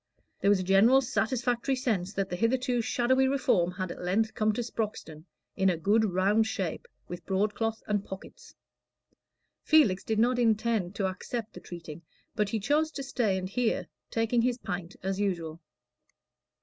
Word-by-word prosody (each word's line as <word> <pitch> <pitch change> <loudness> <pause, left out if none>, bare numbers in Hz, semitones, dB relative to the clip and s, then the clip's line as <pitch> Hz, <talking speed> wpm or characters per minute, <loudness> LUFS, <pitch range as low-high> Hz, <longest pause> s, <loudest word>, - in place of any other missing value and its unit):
There 200 - +2
was 205 -2 +4
a - - -2
general 205 +8 +5
satisfactory 250 +1 0
sense 215 -8 -1
that 195 0 -1
the 180 - -4
hitherto 245 +4 +1
shadowy 260 +3 +2
Reform 245 -10 +2
had 185 -1 -4
at - - -8
length 205 +5 0
come 215 0 +1
to 240 - -2
Sproxton 210 -9 -5 0.3
in 190 0 +3
a 175 - 0
good 205 +7 +3
round 200 +3 +2
shape, 355 - -3 0.2
with 175 -1 -7
broadcloth 215 +3 -1
and 205 -2 0
pockets. 190 -1 -11 1.1
Felix 240 - +4
did 220 - -1
not 245 +3 +3
intend 220 -4 +1
to 195 - -1
accept 215 +4 -4
the - - -9
treating, 170 -2 -9 0.3
but 210 -1 0
he 220 - -1
chose 300 +9 +1
to 275 - -5
stay 235 -8 0
and 185 0 -3
hear, 235 +2 0 0.2
taking 230 +1 +1
his 245 0 +1
pint 180 -6 -5
as 190 +1 -2
usual. 170 -5 -2
215 Hz, 165 wpm, -29 LUFS, 190-240 Hz, 1.1 s, general